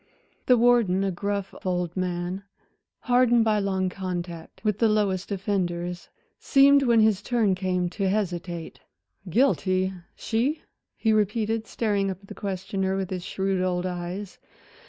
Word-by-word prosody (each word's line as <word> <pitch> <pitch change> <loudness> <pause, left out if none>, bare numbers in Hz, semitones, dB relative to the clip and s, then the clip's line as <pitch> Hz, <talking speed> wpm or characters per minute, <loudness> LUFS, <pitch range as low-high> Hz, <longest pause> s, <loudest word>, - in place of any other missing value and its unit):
The 250 - +6
warden 230 -6 +4
a 195 - 0
gruff 200 +2 -3
old 180 -2 -1
man, 180 0 -2 0.6
hardened 245 -2 +4
by 215 -1 +2
long 190 -2 0
contact 180 -1 -6
with 210 -2 0
the 230 - +4
lowest 200 -3 0
offenders 180 -3 -2 0.3
seemed 280 +1 +5
when 235 -4 +4
his 215 -2 +3
turn 220 -3 +1
came 180 -1 -1
to 195 0 -1
hesitate. 175 -4 -3 0.5
"Guilty, 190 -4 +2 0.2
she?" 250 +8 -1 0.3
he 220 -1 +2
repeated, 215 +1 0
staring 205 -3 0
up 190 - -4
at 195 - -17
the - - -6
questioner 195 0 -2
with 190 -1 -3
his 180 -2 -3
shrewd 190 0 -1
old 180 -1 0
eyes. 180 +2 -5
195 Hz, 140 wpm, -26 LUFS, 180-215 Hz, 0.6 s, The